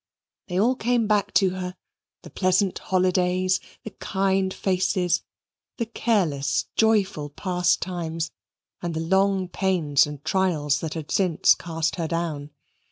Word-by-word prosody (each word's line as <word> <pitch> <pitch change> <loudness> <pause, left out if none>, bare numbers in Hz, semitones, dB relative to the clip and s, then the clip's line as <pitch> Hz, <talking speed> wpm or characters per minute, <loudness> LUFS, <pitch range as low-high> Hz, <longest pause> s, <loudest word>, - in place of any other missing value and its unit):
They 180 -1 -1
all 240 +5 +3
came 240 -1 +1
back 205 -1 +1
to 190 -3 +4
her, 180 0 -5 0.5
the - - -12
pleasant 185 +1 +1
holidays, 185 0 +1 0.2
the 220 - -7
kind 190 -1 0
faces, 185 -2 0 0.6
the 230 - -1
careless, 175 - 0
joyful 205 -9 +2
past 180 +3 0
times, 165 -3 -3 0.5
and 170 -2 -3
the - - -1
long 190 +2 +2
pains 165 -7 +2
and 150 0 -9
trials 155 -7 +1
that 160 -1 -5
had 160 -2 -6
since 180 -5 +4
cast 165 0 -3
her 165 -2 -1
down. 160 -4 -3
185 Hz, 135 wpm, -24 LUFS, 160-195 Hz, 0.6 s, to